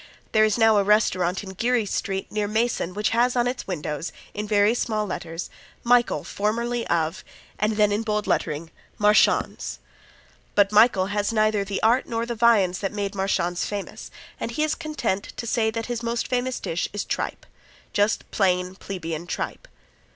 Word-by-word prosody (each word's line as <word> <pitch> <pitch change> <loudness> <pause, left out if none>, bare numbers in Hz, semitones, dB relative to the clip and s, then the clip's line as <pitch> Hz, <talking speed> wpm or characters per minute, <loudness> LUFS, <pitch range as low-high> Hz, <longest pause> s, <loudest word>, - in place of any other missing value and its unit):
There 215 - +5
is 215 0 +1
now 225 -2 +5
a 200 - +4
restaurant 190 -3 +2
in 190 - -7
Geary 235 +4 +1
street 195 -1 -3
near 210 -1 -1
Mason 220 -4 0
which 210 +1 +1
has 240 +2 +2
on 240 -1 +2
its 250 +1 -3
windows 150 -3 -3 0.2
in 210 0 -4
very 205 +1 +4
small 215 -3 -1
letters 170 -3 -5 0.4
"Michael, 240 0 +3
formerly 235 +3 -1
of," 160 -1 0 0.4
and 215 +1 +1
then 210 -1 +4
in 205 +2 +1
bold 210 -1 -1
lettering, 155 +2 -1 0.3
"Marchands." 205 - +2 0.8
But 205 0 +4
Michael 210 -3 +5
has 205 +1 0
neither 215 -2 +2
the 200 0 -4
art 235 +3 +3
nor 230 0 -2
the 240 - -3
viands 215 -6 +3
that 195 - -2
made 200 -1 -3
Marchands 180 -3 0
famous, 205 -1 -5 0.3
and - - -3
he 270 +6 -1
is 310 0 +1
content 300 - -3
to 235 - -4
say 225 -1 +1
that 225 0 -3
his 240 -1 -3
most 235 0 -2
famous 250 0 -1
dish 165 +1 -2
is 205 - -3
tripe - - -3 0.5
just 205 +2 +2
plain, 180 -2 +1
plebeian 175 -4 -6
tripe. - - -4
210 Hz, 175 wpm, -24 LUFS, 190-230 Hz, 0.8 s, There